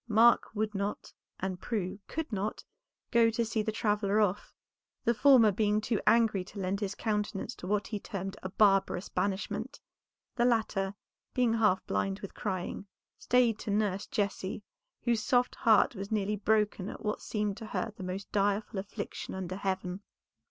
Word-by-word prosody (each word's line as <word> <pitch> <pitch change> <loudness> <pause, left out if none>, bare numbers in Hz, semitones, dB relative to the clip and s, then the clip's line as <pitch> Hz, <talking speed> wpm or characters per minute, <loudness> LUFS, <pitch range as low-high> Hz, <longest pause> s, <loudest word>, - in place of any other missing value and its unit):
Mark 230 +2 +5
would 215 0 -1
not, 200 +1 -3 0.3
and 185 -1 -3
Prue 200 -4 -2
could 320 -3 -4
not, 205 +1 -2 0.5
go 235 -1 +5
to 230 +1 0
see 220 0 0
the 220 - -1
traveller 210 -2 +1
off; 205 -1 +1 0.5
the 235 - +3
former 245 -3 +6
being 210 +1 +2
too 215 0 -1
angry 225 -5 +4
to 195 +3 -13
lend 190 +1 -1
his 200 -1 -3
countenance 210 0 -2
to 180 - -9
what 205 0 +1
he 210 0 -4
termed 195 -1 -5
a 190 - -4
barbarous 195 -2 +3
banishment, 200 0 -2 0.6
the 240 - +2
latter, 215 -5 +1 0.4
being 245 -3 +3
half 215 -5 +2
blind 95 0 -1
with - - -7
crying, 190 0 -4 0.3
stayed 240 -3 +3
to - - -6
nurse 205 -1 0
Jessie, 200 -1 -2 0.4
whose 235 -3 +2
soft 245 +2 +2
heart 220 0 +4
was 200 -1 -6
nearly 210 -1 0
broken 210 -2 +1
at - - -8
what 210 - -1
seemed 210 -2 -2
to 225 - -7
her 225 0 -3
the 195 - -8
most 185 +2 -5
direful 205 0 0
affliction 200 0 -6
under 185 -1 -4
heaven. 190 -1 -2
210 Hz, 165 wpm, -31 LUFS, 195-220 Hz, 0.6 s, former